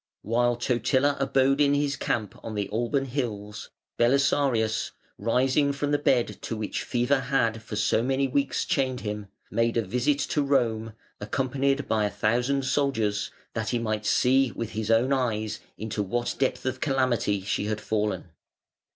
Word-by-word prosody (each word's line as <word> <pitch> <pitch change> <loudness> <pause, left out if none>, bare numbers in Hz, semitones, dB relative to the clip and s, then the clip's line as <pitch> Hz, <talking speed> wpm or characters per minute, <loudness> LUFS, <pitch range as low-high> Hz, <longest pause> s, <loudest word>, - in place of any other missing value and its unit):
While 120 +2 +2
Totila 130 +4 +1
abode 135 +1 +2
in 145 0 +4
his 145 -1 0
camp 110 -6 -2
on 110 - -5
the 100 -1 -1
Alban 120 +5 0
Hills, 105 -6 -4 0.3
Belisarius, 120 -3 +2 0.3
rising 130 +6 +2
from 145 +1 -2
the 145 - +2
bed 125 -4 +1
to 115 - -4
which 110 -1 -3
fever 125 +3 +1
had 120 -4 0
for 110 - -7
so 105 +1 +2
many 135 +2 +1
weeks 140 +1 0
chained 130 -2 0
him, 105 -1 -4 0.2
made 115 +2 +1
a 115 - +2
visit 125 +8 +1
to 150 - +2
Rome, 115 -6 +1 0.3
accompanied 135 +5 0
by 110 -1 +1
a - - 0
thousand 120 +7 0
soldiers, 115 -7 0 0.2
that 110 -1 -2
he 120 - +1
might 110 -2 -2
see 130 0 +3
with 115 -2 -4
his 110 0 -3
own 120 +4 +3
eyes 110 -4 -1 0.2
into 110 -1 -3
what 120 +5 -1
depth 135 0 0
of 130 0 -2
calamity 130 -8 +1
she 100 +1 -2
had 105 0 -2
fallen. 105 -6 -2
120 Hz, 160 wpm, -26 LUFS, 110-135 Hz, 0.3 s, in